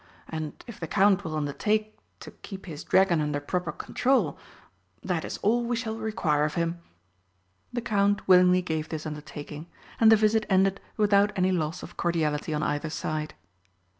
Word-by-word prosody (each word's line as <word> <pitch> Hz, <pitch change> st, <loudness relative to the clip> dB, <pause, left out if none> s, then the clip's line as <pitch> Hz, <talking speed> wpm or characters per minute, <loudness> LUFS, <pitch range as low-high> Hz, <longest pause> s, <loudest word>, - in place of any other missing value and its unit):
And 155 Hz, -2 st, -4 dB
if 235 Hz, -4 st, -10 dB
the 165 Hz, -, -4 dB
Count 200 Hz, +2 st, +3 dB
will 160 Hz, -3 st, -4 dB
undertake 210 Hz, +9 st, -1 dB, 0.3 s
to -, -, -9 dB
keep 195 Hz, -2 st, -10 dB
his 155 Hz, -4 st, -7 dB
dragon 185 Hz, -4 st, +3 dB
under 150 Hz, -1 st, -1 dB
proper 170 Hz, +4 st, -2 dB
control, 260 Hz, -, 0 dB, 0.7 s
that 175 Hz, -4 st, -1 dB
is -, -, -5 dB
all 235 Hz, +4 st, +3 dB
we 240 Hz, +1 st, -1 dB
shall 225 Hz, -1 st, -3 dB
require 210 Hz, -10 st, 0 dB
of 150 Hz, 0 st, -1 dB
him." 170 Hz, 0 st, -1 dB, 0.9 s
The 240 Hz, -, -2 dB
Count 205 Hz, -2 st, +1 dB
willingly 180 Hz, 0 st, +6 dB
gave 160 Hz, -2 st, -3 dB
this 155 Hz, -1 st, -5 dB
undertaking, 150 Hz, 0 st, -7 dB, 0.3 s
and 225 Hz, -1 st, +7 dB
the -, -, +9 dB
visit 215 Hz, 0 st, +2 dB
ended 195 Hz, 0 st, +3 dB, 0.2 s
without 205 Hz, -1 st, +4 dB
any 185 Hz, -1 st, +2 dB
loss 165 Hz, -1 st, -2 dB
of -, -, -11 dB
cordiality 160 Hz, -3 st, 0 dB
on 150 Hz, 0 st, -1 dB
either 145 Hz, +2 st, -1 dB
side. 155 Hz, 0 st, -3 dB
180 Hz, 165 wpm, -27 LUFS, 155-210 Hz, 0.9 s, the